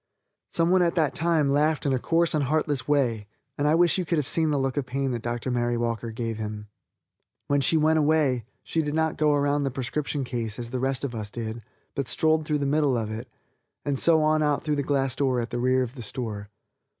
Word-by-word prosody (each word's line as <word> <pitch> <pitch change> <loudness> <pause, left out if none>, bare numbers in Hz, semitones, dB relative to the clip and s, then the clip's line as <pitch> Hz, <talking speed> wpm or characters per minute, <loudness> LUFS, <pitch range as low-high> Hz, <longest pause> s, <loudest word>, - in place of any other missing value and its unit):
Some 165 +1 +2
one 185 0 +4
at 170 -1 +2
that 155 -4 +2
time 160 -4 +2
laughed 150 +2 +1
in 140 - +2
a 130 - +1
coarse 165 +4 +2
and 150 -3 +1
heartless 145 -1 0
way, 120 -8 +1 0.3
and 145 - 0
I 155 - +4
wish 175 +2 +3
you - - 0
could 170 0 -1
have 145 -4 0
seen 160 -1 +3
the 145 - +1
look 135 -1 -1
of 140 -3 -2
pain 135 +1 -1
that 120 -2 -3
Dr. 120 +2 -3
Mary 120 -1 0
Walker 115 0 -2
gave 115 0 -4
him. 105 -1 -6 0.8
When 145 0 +1
she 160 +4 +3
went 160 +1 +3
away, 145 -6 +2 0.2
she 165 - -1
did 150 -1 -3
not 160 -1 +1
go 150 -1 +2
around 145 0 +1
the 140 - 0
prescription 140 +3 -3
case 115 -4 -3
as 120 -1 -6
the 130 - -2
rest 135 +1 -1
of 135 -3 -3
us 110 -2 -5
did, 115 0 -6 0.3
but 140 -3 -3
strolled 160 +2 +2
through 150 - +1
the 140 - -2
middle 140 -2 +2
of 110 -2 -3
it, 110 +2 -6 0.6
and 140 -2 -1
so 160 -2 +4
on 155 0 +3
out 150 -1 +1
through 150 -1 0
the - - +1
glass 135 -2 0
door 130 -2 +1
at 115 0 -4
the 120 - -2
rear 130 +1 +2
of 125 -1 -6
the 130 - -9
store. 105 -3 -5
140 Hz, 240 wpm, -26 LUFS, 120-155 Hz, 0.8 s, one